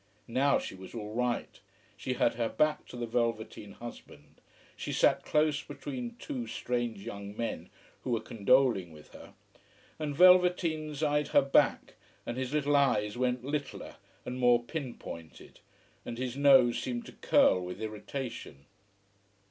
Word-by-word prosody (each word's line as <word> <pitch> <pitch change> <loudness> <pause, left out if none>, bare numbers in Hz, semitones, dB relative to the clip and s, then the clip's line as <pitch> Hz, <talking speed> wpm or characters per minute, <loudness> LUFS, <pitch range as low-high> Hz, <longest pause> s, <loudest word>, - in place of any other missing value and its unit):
Now 135 +4 +3
she - - -5
was 95 +4 -11
all 105 -2 -6
right. 125 0 -2 0.4
She 130 - -3
had 120 - +2
her 115 -1 -1
back 155 0 +1
to 125 - -9
the 120 - -2
velveteen 115 -3 -2
husband, 115 -10 -12 0.3
she - - -5
sat - - +3
close 150 -1 +2
between 250 -4 -6
two 255 -4 -5
strange 120 -4 -3
young 100 +1 -7
men, 115 - -4 0.3
who - - -6
were 115 -2 +1
condoling 115 -4 +2
with 75 -1 -15
her. - - -13 0.6
And 150 -2 -3
velveteens 170 -4 +4
eyed 150 -1 +1
her 145 - +4
back, 135 - +2 0.3
and 120 - -4
his 130 0 -3
little 145 -1 +1
eyes 105 -7 +2
went 125 0 0
littler 145 0 -4 0.3
and 125 +1 -5
more 120 -1 +4
pin 135 -2 -5
pointed, 80 -1 -10 0.4
and 115 - -6
his 125 0 -3
nose 135 -4 +5
seemed 120 -2 -4
to - - -10
curl 90 - +3
with 90 0 -6
irritation. 110 - -6
125 Hz, 150 wpm, -30 LUFS, 115-145 Hz, 0.6 s, nose